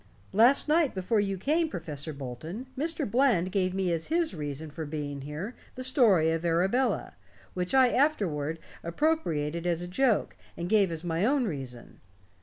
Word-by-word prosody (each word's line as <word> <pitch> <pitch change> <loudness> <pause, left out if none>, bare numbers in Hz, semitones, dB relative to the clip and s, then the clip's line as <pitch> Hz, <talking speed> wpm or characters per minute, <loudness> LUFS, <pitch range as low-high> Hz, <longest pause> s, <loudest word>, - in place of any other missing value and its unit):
Last 240 +9 +5
night, 305 -4 +2
before 195 +4 +1
you 195 -1 0
came, 315 - +1
Professor 155 - -5
Bolton, 145 - -7
Mr. 310 +1 -1
Bland 215 -6 +2
gave 185 -1 0
me 190 -2 0
as 165 -1 -3
his 330 - 0
reason 150 -1 -5
for 160 +1 -5
being 145 -2 -5
here 150 - -5 0.2
the 255 - -5
story 215 - +4
of 165 0 -2
Arabella, 190 +10 +1 0.4
which 180 +6 -2
I 260 -2 +6
afterward 180 - +1 0.3
appropriated 170 - 0
as 175 0 0
a - - -5
joke 230 +4 +1 0.2
and 170 - -3
gave 200 -3 +3
as 165 0 -4
my 170 +1 -1
own 265 +2 +2
reason. 135 - -7
185 Hz, 165 wpm, -28 LUFS, 160-255 Hz, 0.4 s, I